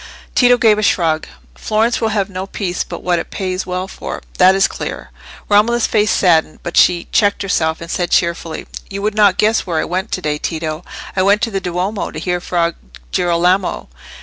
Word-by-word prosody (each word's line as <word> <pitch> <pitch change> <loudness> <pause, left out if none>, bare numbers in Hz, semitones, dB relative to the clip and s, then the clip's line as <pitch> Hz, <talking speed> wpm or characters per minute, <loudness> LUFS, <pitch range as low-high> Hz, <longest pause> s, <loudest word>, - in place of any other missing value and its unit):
Tito 245 -1 +5
gave 220 -3 +4
a - - 0
shrug. 165 -6 +1 0.3
"Florence 220 - 0
will 225 - +2
have 205 -3 0
no 190 0 -6
peace 185 -3 -3
but - - -8
what 175 -1 +1
it - - -6
pays 185 -1 -3
well 180 +1 -3
for; - - -7 0.2
that 185 +1 +6
is 195 - +4
clear." - - -6 0.4
Romola's 225 +3 +3
face 215 -1 +2
saddened, 160 -4 +2
but 175 - -5
she 175 -1 +4
checked 205 -1 +2
herself, 160 -4 0
and 170 0 -7
said, 175 -2 -1
cheerfully, 170 -2 0 0.2
"You 200 0 -5
would 210 0 0
not 205 -3 +4
guess 215 -1 +2
where 170 -3 -1
I - - 0
went 185 +2 -3
to 185 - -2
day, 150 -1 -1
Tito. 160 0 -4 0.3
I 185 - +2
went 200 +3 +3
to 230 - 0
the 195 -1 -2
Duomo, 180 +4 -2
to - - -9
hear 180 -1 -2
Fra 170 -1 0 0.4
Girolamo." 175 - +1
185 Hz, 200 wpm, -17 LUFS, 170-205 Hz, 0.4 s, that